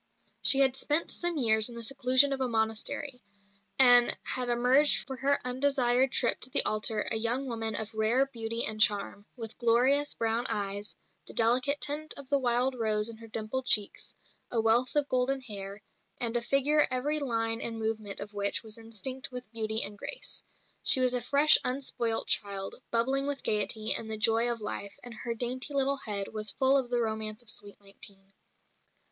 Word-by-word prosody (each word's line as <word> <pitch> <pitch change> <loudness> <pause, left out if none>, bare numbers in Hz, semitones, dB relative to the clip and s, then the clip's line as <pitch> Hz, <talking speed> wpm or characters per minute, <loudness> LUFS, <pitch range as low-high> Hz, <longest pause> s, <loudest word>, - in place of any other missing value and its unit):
She 275 - +6
had 265 -1 +2
spent 295 +4 0
some 345 -2 -2
years 220 -3 +4
in 240 - -11
the 235 - -8
seclusion 260 +2 +3
of 265 - -4
a 260 - +1
monastery, 235 +4 -2 0.6
and 245 -2 +6
had 250 -1 -3
emerged 250 +5 +3
for 265 - -7
her 280 +2 +1
undesired 255 -1 +1
trip 235 - +1
to 255 - 0
the - - +4
altar 215 0 0
a - - +1
young 235 +4 0
woman 225 -3 -3
of 220 +1 -4
rare 220 +5 +1
beauty 230 -3 -2
and 215 0 -3
charm, 205 -1 +1
with 225 -3 -9
glorious 255 +5 +2
brown 230 +2 -1
eyes, 205 0 -4 0.3
the - - -12
delicate 250 +5 +1
tint 300 +2 -2
of 280 -2 -10
the 280 - +2
wild 250 +1 +1
rose 215 -2 -1
in 230 - -8
her 225 0 -13
dimpled 225 +4 -4
cheeks, 205 -2 +1 0.3
a 235 - -1
wealth 225 +4 +2
of 290 -1 +1
golden 255 +1 0
hair, 200 -4 -6 0.4
and 235 -1 -1
a 240 - +1
figure 275 +4 +4
every 280 +4 -1
line 225 -4 -1
and 225 -1 -4
movement 220 -2 -4
of 205 +1 -8
which 200 +2 -1
was 220 0 -10
instinct 230 +4 -4
with 250 -3 -9
beauty 220 -1 +1
and 205 0 -3
grace. - - -4 0.4
She - - +5
was 255 -1 +1
a 250 - -1
fresh, 285 +5 +5
unspoilt 250 -3 -1
child, 200 -2 0 0.2
bubbling 265 +4 0
with 285 -1 -4
gaiety 215 +1 +2
and 220 - -3
the 220 - -4
joy 225 +2 +2
of 230 -2 -4
life, 200 -1 -7
and 245 -1 -10
her 235 +1 -6
dainty 255 +4 -3
little 275 0 +1
head 205 -6 -2
was 215 -1 0
full 265 +7 +1
of 260 -3 0
the 240 -1 -1
romance 220 0 -3
of 220 - -1
sweet 205 -2 -5
nineteen. 195 -1 -7
235 Hz, 190 wpm, -28 LUFS, 220-265 Hz, 0.6 s, She